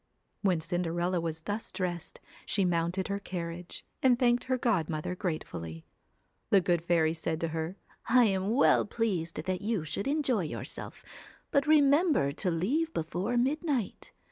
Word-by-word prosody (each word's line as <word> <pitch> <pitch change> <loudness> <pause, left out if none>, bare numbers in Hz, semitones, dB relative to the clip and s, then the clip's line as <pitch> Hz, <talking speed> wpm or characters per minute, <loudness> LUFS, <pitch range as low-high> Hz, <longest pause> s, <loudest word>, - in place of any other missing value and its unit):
When 185 -5 +2
Cinderella 175 +1 -1
was 160 -1 -3
thus 205 +6 -4
dressed, 175 -3 -4 0.3
she 195 - +2
mounted 175 +2 0
her 200 0 -2
carriage, 175 -2 -6 0.2
and 255 -2 +5
thanked 240 -1 +2
her 260 0 +1
godmother 170 -9 0
grate 180 -4 -2
fully. 80 -1 -7 0.6
The 200 - +6
good 175 -2 +1
fairy 165 -2 +2
said 160 -1 -3
to 165 - 0
her: 160 +4 -3 0.3
'I 250 +1 +6
am 195 -1 +1
well 275 - +5
pleased 185 -8 -2
that 185 +1 -2
you 210 -6 -1
should 200 +8 -3
enjoy 275 - +1
yourself. 150 - -6 0.5
But 280 +1 +2
re 310 -1 +7
member 285 - +3
to 180 +6 -1
leave 255 - 0
before 180 +9 -1
midnight. 275 - -1
185 Hz, 155 wpm, -30 LUFS, 165-240 Hz, 0.6 s, re